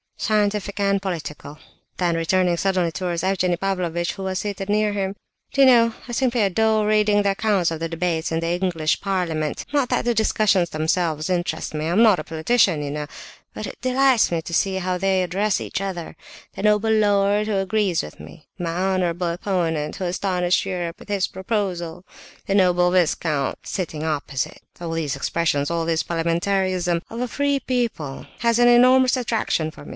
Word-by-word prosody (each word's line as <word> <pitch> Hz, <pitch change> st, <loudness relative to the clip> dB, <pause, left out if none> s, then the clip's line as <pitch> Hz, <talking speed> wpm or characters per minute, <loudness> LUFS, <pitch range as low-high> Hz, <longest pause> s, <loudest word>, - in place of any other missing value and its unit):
"Scientific 210 Hz, -1 st, 0 dB
and 200 Hz, -1 st, +1 dB
political." 155 Hz, -5 st, -6 dB, 0.4 s
Then, 170 Hz, -2 st, 0 dB
turning 180 Hz, 0 st, +2 dB
suddenly 185 Hz, -2 st, +1 dB
towards 175 Hz, 0 st, -3 dB
Evgenie 185 Hz, -2 st, +1 dB
Pavlovitch, 175 Hz, -3 st, -1 dB
who 195 Hz, -, -7 dB
was 190 Hz, 0 st, -2 dB
seated 200 Hz, -1 st, -4 dB
near 210 Hz, 0 st, +2 dB
him: 195 Hz, -1 st, -2 dB, 0.4 s
"Do 275 Hz, -, +1 dB
you 270 Hz, -, +8 dB
know, 230 Hz, -2 st, +5 dB
I -, -, -7 dB
simply 240 Hz, -1 st, +1 dB
adore 215 Hz, +2 st, +2 dB
reading 210 Hz, -1 st, +3 dB
the 200 Hz, -1 st, +2 dB
accounts 195 Hz, -3 st, +1 dB
of 160 Hz, -, -4 dB
the 165 Hz, 0 st, -3 dB
debates 165 Hz, -1 st, -1 dB
in 165 Hz, -, 0 dB
the 165 Hz, -, -2 dB
English 175 Hz, -3 st, 0 dB
parliament. 170 Hz, -6 st, -2 dB
Not 280 Hz, -4 st, +2 dB
that -, -, 0 dB
the 240 Hz, -, +2 dB
discussions 205 Hz, -5 st, +2 dB
themselves 155 Hz, 0 st, -1 dB
interest 175 Hz, -4 st, -2 dB
me; 155 Hz, 0 st, -3 dB
I -, -, -1 dB
am 195 Hz, +7 st, +4 dB
not 210 Hz, -6 st, +5 dB
a -, -, -4 dB
politician, 165 Hz, 0 st, +1 dB
you 140 Hz, -, -4 dB
know; 150 Hz, 0 st, -4 dB, 0.5 s
but -, -, -5 dB
it -, -, -10 dB
delights 255 Hz, -3 st, +3 dB
me 165 Hz, -1 st, -1 dB
to 170 Hz, -, -7 dB
see 190 Hz, +3 st, +1 dB
how 185 Hz, -1 st, -1 dB
they 190 Hz, 0 st, +1 dB
address 190 Hz, +3 st, 0 dB
each -, -, -4 dB
other 185 Hz, -4 st, -5 dB, 0.4 s
'the -, -, -6 dB
noble 210 Hz, +1 st, +3 dB
lord 205 Hz, -1 st, +2 dB
who 215 Hz, -, 0 dB
agrees 195 Hz, -2 st, 0 dB
with -, -, -10 dB
me,' 160 Hz, -, -13 dB
'my 175 Hz, -3 st, -3 dB
honourable 180 Hz, -1 st, 0 dB
opponent 170 Hz, -4 st, -2 dB
who 185 Hz, -, -3 dB
astonished 180 Hz, 0 st, 0 dB
Europe 175 Hz, -3 st, -4 dB
with -, -, -14 dB
his 195 Hz, -2 st, +1 dB
proposal,' 185 Hz, -4 st, -3 dB, 0.4 s
'the 195 Hz, -, 0 dB
noble 180 Hz, -2 st, +4 dB
viscount 160 Hz, -5 st, +1 dB
sitting 160 Hz, -5 st, -4 dB
opposite'—all 155 Hz, +2 st, -4 dB
these 160 Hz, -4 st, -2 dB
expressions, 145 Hz, 0 st, 0 dB
all 170 Hz, -1 st, -1 dB
this 165 Hz, -1 st, 0 dB
parliamentarism 175 Hz, +1 st, 0 dB
of 230 Hz, +2 st, -5 dB
a 250 Hz, -, -1 dB
free 285 Hz, +2 st, 0 dB
people, 235 Hz, -, -3 dB
has 235 Hz, 0 st, +2 dB
an 240 Hz, -, +6 dB
enormous 255 Hz, +1 st, +5 dB
attraction 225 Hz, -9 st, -1 dB
for 150 Hz, -, -13 dB
me. -, -, -10 dB
185 Hz, 180 wpm, -22 LUFS, 165-210 Hz, 0.5 s, you